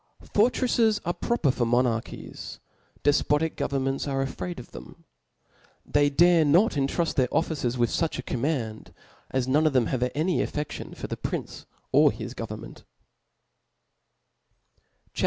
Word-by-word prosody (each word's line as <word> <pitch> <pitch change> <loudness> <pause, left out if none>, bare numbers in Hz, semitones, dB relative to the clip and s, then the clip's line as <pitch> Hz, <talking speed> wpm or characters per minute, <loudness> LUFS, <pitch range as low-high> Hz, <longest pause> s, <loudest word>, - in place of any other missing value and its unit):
Fortrefles 230 -1 +2
arc 175 0 -3
proper 235 - +2
for 120 -2 -1
monarchies; 120 -1 -2 0.4
defpotic 150 +2 +2
governments 135 0 -1
are 135 -1 0
afraid 175 +4 -5
of 120 - -12
them. - - -12 0.8
They 145 0 +3
dare 170 +3 +5
not 170 +9 +4
intruft 145 +4 0
their 130 -3 +1
officers 145 -7 0
withfucha 130 +3 0
command, 120 -4 -3 0.3
as 130 -1 -1
none 150 +4 +3
of 150 - +1
them 130 -3 +3
have 130 - -1
any 165 +4 +1
affedion 150 -1 -4
for - - -5
the - - -4
prince - - -5 0.2
or - - +6
his - - -7
government, - - -8 2.3
CHAP. - - -7
145 Hz, 130 wpm, -26 LUFS, 130-165 Hz, 2.3 s, or